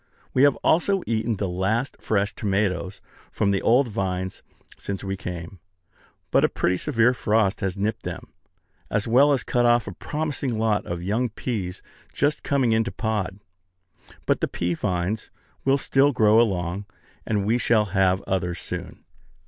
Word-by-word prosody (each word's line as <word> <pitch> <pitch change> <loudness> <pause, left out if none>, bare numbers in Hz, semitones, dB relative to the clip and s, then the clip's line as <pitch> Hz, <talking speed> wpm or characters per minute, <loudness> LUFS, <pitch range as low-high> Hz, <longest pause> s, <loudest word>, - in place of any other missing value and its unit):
We 130 - +3
have 145 -1 +6
also 190 +3 +2
eaten 115 0 0
the 100 0 -2
last 100 +9 -1
fresh 100 -1 0
tomatoes 100 -2 -1 0.3
from 100 -2 +1
the 95 - 0
old 125 +3 +4
vines 95 -3 -3 0.4
since 100 -1 -5
we 95 0 -2
came; 90 -1 -7 0.7
but - - +4
a - - +4
pretty 90 - 0
severe 120 0 +2
frost 105 -4 +1
has 95 0 -2
nipped 105 +3 -1
them, - - -7 0.6
as 105 0 0
well 135 +6 +5
as 140 - +1
cut 120 -1 +2
off 120 -1 +4
a 100 - -6
promising 145 - -3
lot 110 -2 0
of 85 0 -4
young 115 +6 0
peas 105 -5 -4 0.3
just 145 +1 +1
coming 135 -4 +1
into 110 +1 +1
pod. 105 -4 -2 0.9
But - - +1
the - - +1
pea 85 0 -2
vines 90 +4 -2 0.4
will 135 +1 +4
still 140 +1 +3
grow 110 -1 +5
along, 95 -2 -1 0.4
and 105 -3 -1
we 115 +4 +2
shall 110 -3 +3
have 95 -1 +2
others 90 -2 -1
soon. - - -7
105 Hz, 160 wpm, -24 LUFS, 95-120 Hz, 0.9 s, have